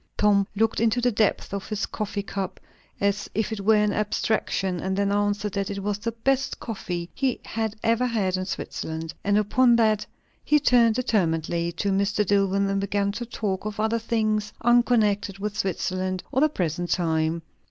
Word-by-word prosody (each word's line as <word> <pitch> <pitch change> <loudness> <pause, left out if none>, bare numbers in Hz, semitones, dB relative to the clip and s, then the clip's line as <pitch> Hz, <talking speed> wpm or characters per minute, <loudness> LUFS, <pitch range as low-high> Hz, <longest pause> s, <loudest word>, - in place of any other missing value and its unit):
Tom 200 -1 +3
looked 220 +1 +1
into 230 +1 +2
the 245 0 +2
depths 210 -2 0
of 200 -1 -4
his 215 -1 -1
coffee 205 -1 -4
cup, 195 -2 -4 0.4
as 200 +1 0
if 220 +2 0
it 220 - -3
were 215 +2 +4
an 210 -1 +2
abstraction, 205 -3 0
and 190 +2 -2
then 200 0 +1
answered, 205 0 0
that 200 -1 -1
it 200 -1 -4
was 205 0 -1
the 230 +2 -2
best 270 +4 0
coffee 175 -6 -5
he 265 -3 0
had 220 -1 -2
ever 230 +2 +2
had 200 -6 0
in 185 0 -2
Switzerland; 160 -3 -5
and 205 +1 +2
upon 235 +4 +4
that 215 -2 +2 0.4
he 300 - +4
turned 235 -5 +4
determinately 170 -8 0
to 200 +4 -1
Mr. 200 +2 +1
Dillwyn 195 0 +2
and 195 0 0
began 200 0 0
to 235 +3 -5
talk 200 -5 -3
of 215 0 -5
other 220 +2 +1
things, 215 -2 0
unconnected 225 -5 +3
with 205 +1 -4
Switzerland 185 -1 -2
or 265 - +1
the 310 - +5
present 175 - -2
time. 160 -1 0
205 Hz, 180 wpm, -25 LUFS, 195-225 Hz, 0.4 s, the